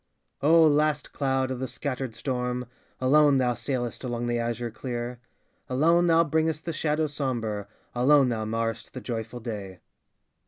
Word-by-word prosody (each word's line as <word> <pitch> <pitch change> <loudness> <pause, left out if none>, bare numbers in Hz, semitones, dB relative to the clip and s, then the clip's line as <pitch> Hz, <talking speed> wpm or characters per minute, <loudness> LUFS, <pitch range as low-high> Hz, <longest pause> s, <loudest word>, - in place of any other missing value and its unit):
O 160 +3 +6
last 150 0 +2
cloud 135 -2 0
of 130 - -3
the 130 - -2
scattered 130 -4 -4
storm, 125 -1 -2 0.3
Alone 145 +2 +5
thou 125 -2 +2
sailest 120 0 -3
along 120 -1 -2
the 120 0 0
azure 120 0 -2
clear; 120 +1 -5 0.5
Alone 165 +7 +3
thou 165 0 +5
bringest 160 0 0
the 165 - -2
shadow 155 0 0
sombre, 120 -8 -3 0.3
Alone 135 +2 +5
thou 110 -2 -1
marrest 115 +1 -3
the 130 - -5
joyful 115 -1 -5
day. 100 -5 -6
130 Hz, 150 wpm, -27 LUFS, 120-150 Hz, 0.5 s, O